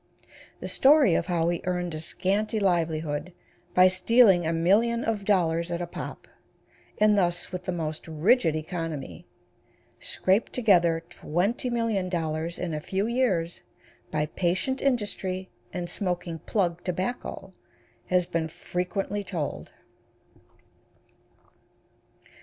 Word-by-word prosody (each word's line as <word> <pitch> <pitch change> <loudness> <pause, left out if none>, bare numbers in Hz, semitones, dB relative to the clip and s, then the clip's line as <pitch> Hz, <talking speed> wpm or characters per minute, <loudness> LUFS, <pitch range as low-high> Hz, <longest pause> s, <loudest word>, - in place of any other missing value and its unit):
The - - -4
story 275 - +5
of 165 - 0
how 170 -2 +1
he 175 -1 -1
earned 180 -1 -1
a 155 - -4
scanty 200 +6 -1
livelihood 165 -3 0 0.4
by 185 0 +8
stealing 190 -1 +4
a - - +1
million 210 +8 +2
of 210 -3 -2
dollars 170 -4 +2
at 170 0 -2
a 175 - -2
pop, 170 - -8 0.7
and 210 0 +4
thus, 175 -2 +1
with 180 -1 -5
the - - -1
most 160 -3 -4
rigid 165 +2 +3
economy, 155 - -5 0.7
scraped 190 +4 +1
together 175 -8 +3
$20,000,000 180 -5 -1
in 175 -3 -3
a 155 - -2
few 190 +5 -1
years 215 -9 0 0.5
by 150 -1 0
patient 185 - -1
industry 205 -7 -1 0.2
and 175 -1 -4
smoking 175 -3 -2
plug 175 -2 -1
tobacco, 190 +1 -4 0.6
has 180 -1 +2
been 165 -1 -1
frequently 195 +5 -3
told. 170 -7 -4
180 Hz, 115 wpm, -27 LUFS, 165-205 Hz, 0.7 s, by